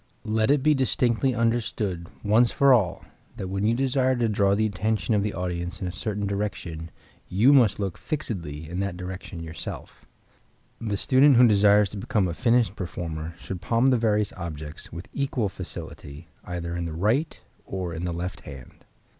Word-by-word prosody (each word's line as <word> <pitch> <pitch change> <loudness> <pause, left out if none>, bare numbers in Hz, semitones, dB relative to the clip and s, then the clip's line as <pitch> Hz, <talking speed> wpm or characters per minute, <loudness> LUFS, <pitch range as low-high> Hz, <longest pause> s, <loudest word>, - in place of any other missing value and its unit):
Let 110 +1 +1
it 140 -1 +3
be 155 0 +5
distinctly 130 -2 +1
understood 110 -7 -1 0.2
once 110 +3 +4
for 140 -1 +5
all 105 -8 +1 0.3
that 95 - -4
when 95 +1 -2
you 115 +2 +3
desire 130 0 +2
to 120 -2 +1
draw 100 -2 +2
the 110 +1 +2
attention 110 +2 0
of 105 - +3
the 105 0 -2
audience 90 0 -3
in - - -4
a 90 - -2
certain 105 +2 -3
direction 95 -5 -4 0.4
you 115 +10 +5
must 120 -8 +4
look 95 -3 -3
fixedly 85 - -4
in 90 +3 -4
that 100 -3 -2
direction 90 -1 -7
yourself. 80 -1 -7 0.7
The 105 -3 -2
student 135 +6 +5
who 125 - +8
desires 105 -1 +5
to 105 - -7
become 100 -1 0
a 85 - -3
finished 115 -1 +2
performer 85 -3 -5
should 90 0 -7
palm 120 +3 +3
the 125 - +4
various 105 -3 +1
objects, 80 -3 -7
with 85 +4 -8
equal 130 -6 -1
facility, 75 -3 -9
either 85 -1 -4
in 85 0 -2
the 80 - -4
right 110 - 0 0.2
or 90 -3 -4
in 80 +1 -5
the 90 - -1
left 90 +2 -4
hand. 70 -3 -12
100 Hz, 180 wpm, -25 LUFS, 85-115 Hz, 0.7 s, who